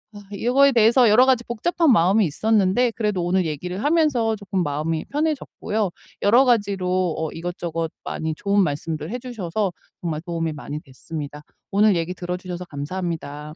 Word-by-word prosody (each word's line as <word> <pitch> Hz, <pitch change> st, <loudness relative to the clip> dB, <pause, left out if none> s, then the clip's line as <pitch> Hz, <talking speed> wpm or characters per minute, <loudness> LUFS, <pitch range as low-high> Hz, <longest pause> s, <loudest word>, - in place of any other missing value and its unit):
아 205 Hz, -, -9 dB
이 200 Hz, +3 st, -5 dB
요거에 275 Hz, +2 st, +5 dB
대해서 235 Hz, +1 st, +5 dB
여러 245 Hz, +5 st, +6 dB
가지 255 Hz, -2 st, +3 dB
복잡한 310 Hz, +7 st, +1 dB
마음이 200 Hz, +1 st, +4 dB
있었는데 215 Hz, -, +2 dB
그래도 210 Hz, -6 st, -1 dB
오늘 180 Hz, 0 st, +1 dB
얘기를 180 Hz, +6 st, -4 dB
하면서 290 Hz, -8 st, +2 dB
쪼끔 195 Hz, -2 st, -3 dB
마음이 155 Hz, +2 st, -2 dB
편해졌고요. 280 Hz, -, -2 dB, 0.3 s
여러 240 Hz, +7 st, +6 dB
가지로 185 Hz, -6 st, +1 dB
어 160 Hz, -1 st, -2 dB
이것저것 165 Hz, -1 st, -4 dB
많이 160 Hz, -1 st, -3 dB
좋은 200 Hz, +3 st, +1 dB
말씀들 155 Hz, +2 st, -3 dB
해 245 Hz, -, -2 dB
주셔서 210 Hz, -5 st, -3 dB, 0.3 s
정말 160 Hz, -3 st, -3 dB
도움이 165 Hz, -2 st, -3 dB
많이 150 Hz, +1 st, -6 dB
됐습니다. 145 Hz, +2 st, -8 dB, 0.3 s
오늘 205 Hz, 0 st, +4 dB
얘기 170 Hz, +2 st, -1 dB
들어주셔서 180 Hz, 0 st, -5 dB
감사합니다. 155 Hz, -1 st, -5 dB
185 Hz, 395 characters per minute, -23 LUFS, 165-225 Hz, 0.3 s, 여러